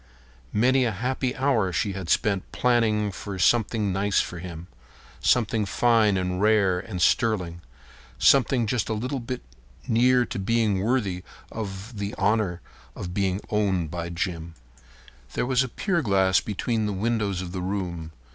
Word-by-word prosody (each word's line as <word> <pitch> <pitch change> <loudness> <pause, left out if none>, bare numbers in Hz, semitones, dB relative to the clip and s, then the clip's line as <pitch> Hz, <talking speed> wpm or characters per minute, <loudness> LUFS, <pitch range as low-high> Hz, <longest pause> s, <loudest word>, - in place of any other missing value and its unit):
Many 130 +5 +3
a 115 - +1
happy 125 +4 -2
hour 130 -9 +1
she 100 +3 -1
had 95 -3 -6
spent 100 -1 +1
planning 110 -4 +2
for 100 0 -6
something 105 +1 +2
nice 100 +1 +1
for 85 - -3
him. 85 -1 -8 0.5
Something 110 -2 +2
fine 110 0 +3
and 90 0 -2
rare 100 -4 +3
and 90 -1 -6
sterling—something 85 - +1
just 110 +1 -1
a 110 - 0
little 130 +5 -3
bit 125 +1 -5 0.4
near 125 +2 +4
to - - -5
being 105 -1 +1
worthy 105 -5 0 0.3
of 105 +1 -6
the 100 +1 -3
honor 100 -3 +1 0.3
of 90 0 -6
being 95 0 0
owned 95 -6 0
by 85 0 -4
Jim. 85 -1 -4 0.8
There - - 0
was 125 0 +2
a 130 - -1
pier 175 - -1
glass 95 -6 +3
between 110 +1 -1
the 105 - -2
windows 100 -2 -1
of 90 - -7
the 90 0 -4
room. 90 -4 -4
100 Hz, 150 wpm, -25 LUFS, 90-115 Hz, 0.8 s, near